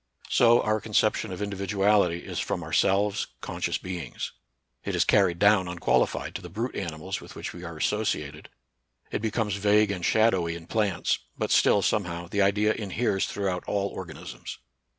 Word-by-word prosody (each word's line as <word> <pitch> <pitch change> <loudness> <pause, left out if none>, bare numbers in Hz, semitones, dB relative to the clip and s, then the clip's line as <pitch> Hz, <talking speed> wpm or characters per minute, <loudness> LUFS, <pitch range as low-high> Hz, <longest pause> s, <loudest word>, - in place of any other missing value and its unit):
So, 120 0 +5
our 110 0 +1
conception 110 -1 +1
of 90 +3 -4
indi 100 -1 -3
viduality 100 -2 +2
is - - -5
from - - -2
ourselves, 100 +1 +1
conscious - - -2
beings: 90 -2 -5 0.5
it - - -2
is - - +4
carried 95 -4 +3
down 105 -1 +4
unqualified 85 -3 0
to 95 - -5
the 90 - -9
brute 115 +8 -4
animals 85 +1 -4
with - - -12
which - - -6
we 90 - -10
are 85 -2 -7
associated; 75 -7 -2 0.6
it - - -2
be 110 - 0
comes 105 -2 -1
vague 105 +1 +3
and 90 -3 -4
shadowy 95 -5 +2
in 85 -1 -9
plants, 100 -3 0 0.2
but - - -2
still, 100 - +4
somehow, 85 -4 -1
the 100 +4 0
idea 105 +2 +3
inheres 105 -1 -1
throughout 95 -3 -2
all 100 -1 0
organ 90 -4 -8
isms. - - -8
100 Hz, 170 wpm, -27 LUFS, 90-105 Hz, 0.6 s, So